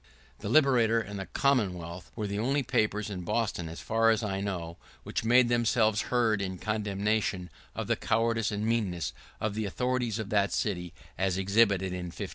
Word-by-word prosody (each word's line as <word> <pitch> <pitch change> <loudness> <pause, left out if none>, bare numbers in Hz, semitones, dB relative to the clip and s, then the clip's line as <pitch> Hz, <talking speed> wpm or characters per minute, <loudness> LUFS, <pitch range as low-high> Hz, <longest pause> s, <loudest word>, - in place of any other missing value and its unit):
[¶26] - - -35
The - - -5
Liberator 125 -6 +4
and 100 -2 -5
the 95 - -4
Commonwealth 90 -9 -1
were 110 - -3
the 100 0 -3
only 135 +5 +1
papers 105 -3 0
in 90 -2 -4
Boston, 105 -2 -1
as 80 - -8
far 115 0 +2
as 115 +1 +2
I 95 -2 -2
know, 85 -4 -4 0.3
which - - -3
made 120 +2 +5
themselves 115 -2 +2
heard 115 -4 +2
in 95 -1 -3
condemnation 105 -3 -1 0.2
of - - -3
the - - +1
cowardice 115 -1 +1
and 105 +1 -2
meanness 100 -8 -1 0.3
of 110 -1 -1
the 110 0 -2
authorities 125 +1 -1
of 110 -3 -4
that 100 -2 +2
city, 90 -5 -2 0.3
as 95 -1 +1
exhibited 100 -1 +2
in 90 -1 -4
'51. - - -6
105 Hz, 185 wpm, -29 LUFS, 95-115 Hz, 0.3 s, made